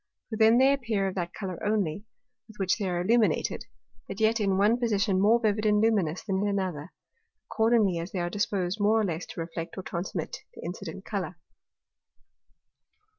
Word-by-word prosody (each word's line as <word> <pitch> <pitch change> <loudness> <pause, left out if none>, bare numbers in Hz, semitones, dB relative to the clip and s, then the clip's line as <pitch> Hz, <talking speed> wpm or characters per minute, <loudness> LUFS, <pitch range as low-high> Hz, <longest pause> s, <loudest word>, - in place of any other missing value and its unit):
For - - -2
then 220 +1 +6
they 265 +2 +5
appear 225 -7 -1
of 190 - -3
that 175 -2 -3
Colour 185 -4 -6
only, 205 -3 -1 0.4
with 220 - -16
which 190 +2 0
they 195 -3 -1
are 175 -1 -1
illuminated; 215 -2 +1 0.4
but 195 - -7
yet 220 +1 +3
in 195 -2 +1
one 215 +5 +3
Position 205 -5 +1
more 220 +4 +5
vivid 215 -2 0
and 210 0 +4
luminous 200 -7 +1
than 190 -2 -1
in 205 - +1
another, 185 -6 -2 0.5
accordingly 220 -6 +2
as 170 +3 -6
they - - -4
are 175 -1 -1
disposed 195 0 -1
more 210 +2 +3
or - - +2
less 170 -2 -3
to - - -9
reflect 165 +1 -5
or 190 - -5
transmit 185 - -4 0.2
the - - -10
incident - - -7
Colour. - - -4
200 Hz, 180 wpm, -28 LUFS, 185-220 Hz, 0.5 s, then